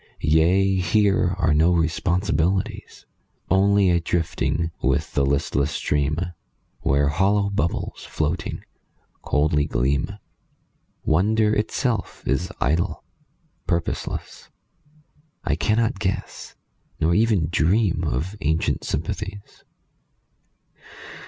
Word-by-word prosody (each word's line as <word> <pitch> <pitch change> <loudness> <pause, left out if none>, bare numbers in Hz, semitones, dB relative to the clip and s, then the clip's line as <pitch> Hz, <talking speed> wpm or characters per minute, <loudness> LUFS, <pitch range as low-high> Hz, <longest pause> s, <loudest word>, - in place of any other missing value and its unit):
Yea, 90 +5 +3
here 95 -1 +2
are 80 -4 +2
no 80 +4 +4
responsibilities. 85 +2 0 0.5
Only 100 0 +4
a 85 - +3
drifting 85 0 -1
with 65 0 0
the 70 - +2
listless 70 +1 +1
stream 75 0 0 0.6
Where 70 +1 +2
hollow 100 +5 +2
bubbles, 100 -4 -2
floating, 80 +3 -3 0.6
coldly 75 0 +1
gleam. 65 +3 -1 0.9
Wonder 105 +6 +2
itself 110 +3 -1
is 80 +6 -1
idle, 80 +6 0 0.6
purposeless; 85 -1 -3 0.9
I 75 - 0
cannot 110 +7 +1
guess 100 0 -4 0.4
Nor 80 +2 +2
even 105 -6 +2
dream 90 +1 +2
of 80 - -2
ancient 80 +1 0
sympathies. 100 +4 -5
85 Hz, 90 wpm, -23 LUFS, 75-100 Hz, 0.9 s, no